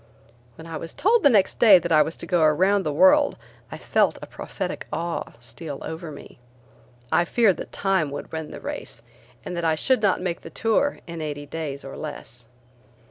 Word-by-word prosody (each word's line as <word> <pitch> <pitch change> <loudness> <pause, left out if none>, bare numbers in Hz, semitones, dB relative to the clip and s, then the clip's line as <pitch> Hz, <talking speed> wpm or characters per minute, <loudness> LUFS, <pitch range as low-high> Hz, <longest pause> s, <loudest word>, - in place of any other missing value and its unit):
When 160 - -12
I 165 -1 -6
was 165 +1 -7
told 450 +4 +3
the 285 - +6
next 205 -6 +2
day 210 -5 +8
that 170 -1 -3
I 155 -1 +6
was 160 +2 -1
to - - -5
go 175 -1 +1
around 185 +6 +3
the 155 - -2
world 285 - +4 0.3
I - - -6
felt - - +1
a - - -4
prophetic - - -6
awe 170 0 -3
steal 140 +4 -7
over 160 0 -6
me. 145 -3 -12 0.7
I 175 - +4
feared 205 +1 +2
that - - -8
Time 190 -6 0
would 145 +1 -7
win 160 -1 -5
the - - -8
race 115 - -7 0.4
and 180 - -5
that 170 - -3
I 160 -1 +2
should 255 - +2
not 200 -3 +2
make 180 -1 -3
the - - -10
tour 225 +6 0
in 170 -1 -7
eighty 145 -1 -5
days 145 -2 -6
or 135 - -8
less. 120 -6 -8
165 Hz, 200 wpm, -24 LUFS, 155-195 Hz, 0.7 s, day